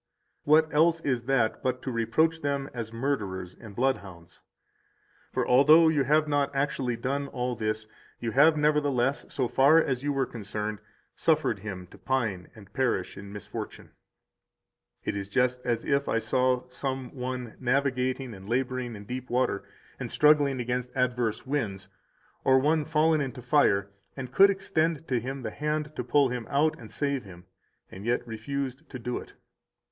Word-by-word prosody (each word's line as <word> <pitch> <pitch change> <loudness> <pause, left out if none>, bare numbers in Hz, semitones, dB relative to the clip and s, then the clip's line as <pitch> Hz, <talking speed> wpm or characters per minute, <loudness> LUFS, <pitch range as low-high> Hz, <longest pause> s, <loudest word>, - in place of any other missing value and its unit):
What 155 +2 +4
else 165 +2 +4
is 125 -6 -1
that 125 -4 +1
but 130 0 -2
to 130 - -3
reproach 140 +8 +1
them 140 -1 -1
192 125 - -6
as 110 -1 -4
murderers 95 -9 -2
and 105 -4 -11
bloodhounds? 95 -9 -3 0.9
For - - -1
although 155 +6 +7
you 145 -4 +2
have 155 +3 +3
not 145 -1 +1
actually 135 -4 0
done 140 +4 -2
all 125 -1 -2
this, 110 -1 -2 0.3
you 115 -1 -2
have 150 +6 +5
nevertheless, 145 -3 +1
so 130 -3 0
far 140 +6 +5
as 135 -6 +2
you 145 +1 -1
were 135 -1 +1
concerned, 105 -2 -5 0.4
suffered 155 -10 +1
him 95 -3 -6
to - - -14
pine 115 -9 -1
and 100 -4 -15
perish 125 -8 0
in 100 0 -9
misfortune. 105 -1 -7 1.1
It - - -2
is 100 -1 -4
just 125 +3 +1
as 120 -1 -1
if 140 0 +1
I - - +2
saw 125 +2 +1
some 130 0 -4
one 125 -3 -5
navigating 130 -1 0
and 95 0 -11
laboring 125 -1 -1
in 100 0 -10
deep 125 +3 -6
water 120 -5 0 0.3
[and - - -4
struggling 145 -3 +4
against 125 +1 -2
adverse 125 -3 0
winds] 115 -9 -3 0.5
or 130 0 +5
one 150 +3 +2
fallen 155 0 +3
into 130 -2 -5
fire, 100 -8 +3 0.3
and 130 -2 -6
could 195 +1 +7
extend 165 -5 0
to 125 -2 +2
him 130 +3 -5
the 110 - -3
hand 150 +2 -2
to 125 - -3
pull 135 +2 +3
him 120 -2 -4
out 150 +3 +2
and 110 -2 -11
save 140 -3 -1
him, 90 -2 -13 0.5
and 95 - -9
yet 120 +2 0
refused 135 +5 -4
to 130 - -6
do 125 0 -3
it. - - -12
130 Hz, 170 wpm, -28 LUFS, 115-145 Hz, 1.1 s, although